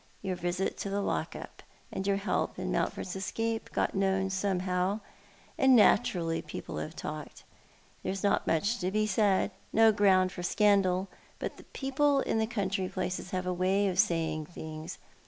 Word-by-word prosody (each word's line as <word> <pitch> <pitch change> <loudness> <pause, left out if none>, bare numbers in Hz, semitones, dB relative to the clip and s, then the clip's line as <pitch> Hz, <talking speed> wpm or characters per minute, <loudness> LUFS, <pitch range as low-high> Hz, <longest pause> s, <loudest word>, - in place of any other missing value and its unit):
Your 190 -2 -1
visit 175 +2 -2
to 200 - -3
the 200 +1 -1
lock 200 - -2
up, - - -9 0.3
and 190 - -3
your 200 -1 +2
help 200 - -1
in - - -3
Mountford's 180 - -2
escape 225 +4 -2
got - - 0
known 190 -1 +1
somehow 185 +1 0 0.3
— - - -28
and 265 -1 +6
naturally 170 -6 +3
people - - -7
have - - -5
talked. - - -7 0.6
There - - -2
is 195 0 -5
not 200 - +2
much 205 +9 +1
to 180 - 0
be 215 +2 +1
said— 205 -2 +2 0.2
no 225 0 +6
ground 190 -3 +4
for 180 - -7
scandal 195 -1 +3 0.2
— - - -29
but - - -7
people 275 +1 +2
in 220 -3 0
country 195 -4 -1
places 180 - -3
have 185 0 -2
a 180 - 0
way 190 +3 +2
of 185 0 -2
saying 160 -6 +1
things. 155 -2 -7
190 Hz, 175 wpm, -30 LUFS, 180-210 Hz, 0.6 s, and